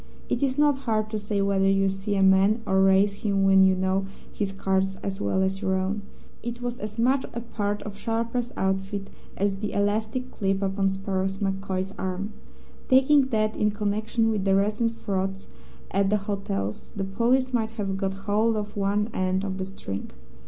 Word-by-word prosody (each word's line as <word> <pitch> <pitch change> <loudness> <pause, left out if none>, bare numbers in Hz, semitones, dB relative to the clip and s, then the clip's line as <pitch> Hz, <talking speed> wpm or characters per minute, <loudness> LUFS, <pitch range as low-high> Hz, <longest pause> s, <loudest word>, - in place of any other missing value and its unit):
It 240 - 0
is 270 -1 +1
not 295 -1 +4
hard 215 -1 +1
to 215 - -1
say 205 -1 -1
whether 195 -1 +2
you 195 0 +3
see 195 +2 -2
a 195 - +3
man 195 +4 +4
or 190 -1 +3
raise 195 +1 +4
him 200 -2 +1
when 195 0 +6
you 190 0 +5
know 190 +1 0 0.3
his 200 -2 -2
cards 190 0 0
as 195 0 -3
well 190 - +1
as 190 +1 -1
your 190 -2 +1
own. 190 +2 -1 0.4
It 240 +1 -5
was 245 0 -4
as 210 +1 -6
much 260 +4 +3
a - - -1
part 205 -3 -3
of 205 -1 -7
a - - -15
sharper's 230 +2 -1
outfit 195 +1 -1 0.3
as 200 0 +1
the 205 +1 -4
elastic 220 +5 -1
clip 195 0 -1
upon 195 0 +1
Sparrow 195 0 -1
MacCoy's 195 -1 -2
arm. 190 +3 -3 0.6
Taking 265 +1 +5
that, 215 -3 0
in 210 - +2
connection 215 +2 0
with 210 -3 -1
the 195 0 +3
recent 215 +4 +1
frauds 195 -2 -3 0.4
at 195 0 +2
the 210 - +3
hotels, 195 - -3
the 195 - -2
police 245 +6 +1
might 225 -2 +1
have 195 -2 -1
got 195 0 -2
hold 220 +2 +2
of 210 0 -4
one 205 +1 +1
end 185 +1 0
of 190 -1 -3
the 190 - -2
string. 100 - -6
200 Hz, 190 wpm, -26 LUFS, 195-215 Hz, 0.6 s, when